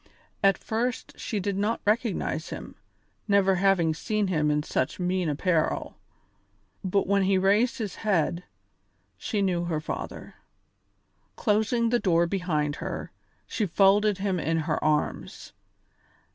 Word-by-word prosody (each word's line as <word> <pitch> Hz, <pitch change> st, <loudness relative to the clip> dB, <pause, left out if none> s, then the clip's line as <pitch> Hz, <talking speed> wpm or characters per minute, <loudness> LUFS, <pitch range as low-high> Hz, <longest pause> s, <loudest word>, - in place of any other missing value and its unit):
At 195 Hz, -2 st, +5 dB
first 240 Hz, +3 st, -3 dB
she 210 Hz, -, -3 dB
did 200 Hz, +1 st, -2 dB
not 215 Hz, +3 st, 0 dB
recognise 210 Hz, -7 st, 0 dB
him, -, -, -7 dB, 0.5 s
never 195 Hz, -2 st, +3 dB
having 180 Hz, -4 st, +3 dB
seen 210 Hz, +4 st, -1 dB
him 150 Hz, -4 st, +1 dB
in 150 Hz, 0 st, +1 dB
such 140 Hz, +2 st, -2 dB
mean 180 Hz, -1 st, 0 dB
apparel; 160 Hz, +2 st, 0 dB, 0.9 s
but 195 Hz, +1 st, +1 dB
when 200 Hz, +1 st, +2 dB
he 190 Hz, 0 st, +3 dB
raised 205 Hz, +7 st, +2 dB
his 215 Hz, -6 st, -4 dB
head, 180 Hz, -4 st, 0 dB, 0.7 s
she 210 Hz, -3 st, -2 dB
knew 175 Hz, -3 st, 0 dB
her 165 Hz, -3 st, -1 dB
father. 155 Hz, -, -6 dB, 1.0 s
Closing 225 Hz, +1 st, +1 dB
the 240 Hz, +1 st, +2 dB
door 170 Hz, -4 st, +3 dB
behind 165 Hz, -5 st, -1 dB
her, -, -, -5 dB, 0.3 s
she 210 Hz, -, -2 dB
folded 200 Hz, +3 st, +4 dB
him 195 Hz, -2 st, -1 dB
in 165 Hz, 0 st, 0 dB
her 155 Hz, -, -2 dB
arms. 150 Hz, -1 st, -1 dB
195 Hz, 130 wpm, -27 LUFS, 170-210 Hz, 1.0 s, At